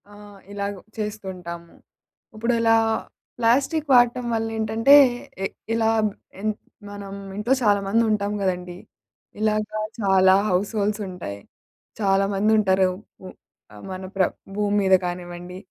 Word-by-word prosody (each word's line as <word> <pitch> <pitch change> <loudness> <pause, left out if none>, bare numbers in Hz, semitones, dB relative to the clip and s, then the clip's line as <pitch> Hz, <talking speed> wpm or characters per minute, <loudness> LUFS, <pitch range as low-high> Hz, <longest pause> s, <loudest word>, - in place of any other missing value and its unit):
ఆహ్, 205 -1 -14
ఇలాగ 200 0 -3 0.3
చేస్తుంటాము. 185 -5 -6 0.6
ఇప్పుడలా 230 0 +2 0.6
ప్లాస్టిక్ 270 +6 +2
వాడటం 245 0 +4
వల్ల 225 0 0
ఏంటంటే, 220 +5 +4 0.5
ఎ - - +1 0.3
ఇలా 225 -1 +2 0.2
బ్ - - -4 0.3
ఎన్ 215 +1 +1 0.4
మనం 200 -1 -8 0.2
ఇంట్లో 220 +5 +1
చాలా 205 -2 +4
మందుంటాం 210 -1 +1
గదండీ, 180 -2 -2 0.6
ఇలాగ 215 0 +1 0.4
చాలా 190 -2 +5
హౌస్‌హోల్డ్స్ 205 +3 0
ఉంటాయి. 100 - -7 0.6
చాలా 195 -1 +2
మందుంటారు. 195 -2 +3 0.3
ఉ - - -8 0.6
మన 185 0 -6
ప్ర 190 - +3 0.3
భూమి 205 0 0
మీద 190 -1 +3
కానివ్వండి 175 0 -6
205 Hz, 110 wpm, -23 LUFS, 190-220 Hz, 0.6 s, చాలా